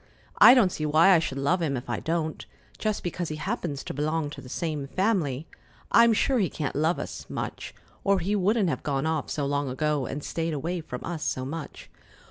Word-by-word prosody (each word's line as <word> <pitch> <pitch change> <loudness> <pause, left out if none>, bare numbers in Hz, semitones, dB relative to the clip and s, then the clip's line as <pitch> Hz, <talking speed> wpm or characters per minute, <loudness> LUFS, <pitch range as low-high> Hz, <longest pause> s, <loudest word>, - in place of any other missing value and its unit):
I 250 - +10
don't 210 -8 +4
see 155 -2 -2
why 155 +5 +5
I 175 - +6
should 140 -4 -3
love 145 +7 +1
him 140 -5 0
if 125 - -7
I - - -2
don't, 160 -1 -2 0.4
just 215 -1 -1
because 175 -1 -3
he 155 - -3
happens 170 - -3
to - - -5
belong 150 +1 -1
to - - -8
the 125 - -12
same 150 -2 -3
family. 165 - 0 0.5
I'm 235 0 +7
sure 250 +4 +2
he 190 - +1
can't 145 -4 -4
love 160 +4 +2
us - - -6
much, - - -5 0.3
or 200 -1 +3
he 190 +4 0
wouldn't 205 0 +2
have 130 - -2
gone 140 -1 -1
off 160 -3 -1
so 145 - -2
long 140 0 -1
ago 145 0 -1
and 145 +1 -5
stayed 165 -1 -2
away 170 +5 -3
from 125 -5 -7
us 170 -2 -4
so 130 - -2
much." 150 +1 -7
160 Hz, 215 wpm, -27 LUFS, 145-180 Hz, 0.5 s, I